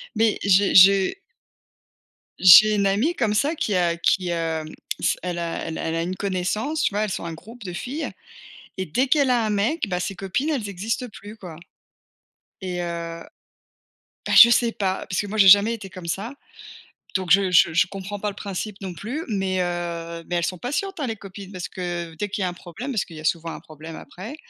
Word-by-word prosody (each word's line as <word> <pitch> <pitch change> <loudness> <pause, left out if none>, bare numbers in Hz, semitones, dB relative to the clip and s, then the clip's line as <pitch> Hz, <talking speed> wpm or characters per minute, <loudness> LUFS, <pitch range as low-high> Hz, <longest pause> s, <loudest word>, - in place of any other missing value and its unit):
Mais 220 -1 +2
j'ai 200 0 +4
je 195 0 +7 1.3
j'ai 210 +4 +9
une 200 -1 +2
amie 225 - +1
comme 220 -5 0
ça 285 +9 +1
qui 210 -8 -1
a 170 -2 +1
qui, 180 +1 +1
hem, 165 -2 -2 0.3
s - - +1
elle 175 -1 -3
a 170 -1 -3
elle 160 - -5
a - - -4
elle 165 - -2
a 165 - 0
une 180 +2 -3
connaissance, 200 - -2
tu - - +2
vois, 205 - 0
elles 215 - -2
sont - - -4
un 165 - -5
groupe 225 +8 -12
de 180 -3 -6
filles 265 - -4 0.7
et 190 - -2
dès 250 - +1
qu'elle 280 -1 +3
a 240 -3 +2
un 215 - -1
mec, 210 +6 0
bah, 180 -2 -2
ses 195 - -3
copines 195 - -2
elles 250 -9 -2
existent 210 +6 -3
plus, 210 +1 -11
quoi. 180 -7 -10 1.1
Et 180 -2 -3
heu, - - -3 1.4
bah, - - -1
je 235 - +11
sais 235 0 +3
pas 190 -3 -2
parce 180 - -1
que 205 - -6
moi 215 +2 -5
j'ai 195 -2 +6
jamais 205 +4 +7
été 205 -4 -10
comme 185 -2 -9
ça. 200 - -3 0.8
Donc 185 -2 -1
je 195 0 +5
je 170 -2 +5
je 170 - +4
comprends 195 +1 -6
pas 210 - -2
le 200 - -8
principe 200 0 -5
non 190 -2 -5
plus, 235 - -5
mais 195 -4 -1
heu, 170 -1 -4
mais 175 - -1
elles 170 - 0
sont 185 - -3
patientes, 340 - -3
hein, 275 - -1
les 225 -1 -4
copines, 195 0 -10
parce 180 -3 -5
que 175 -2 -5
dès 205 +6 -4
qu'il 195 0 -3
y - - +1
a - - 0
un - - -6
problème, 180 - -7
parce 215 - 0
qu'il 165 - -12
y - - -8
a 155 - -8
souvent 165 0 0
un - - -7
problème 155 +1 -11
après, 215 +10 -9
195 Hz, 225 wpm, -23 LUFS, 175-215 Hz, 1.4 s, je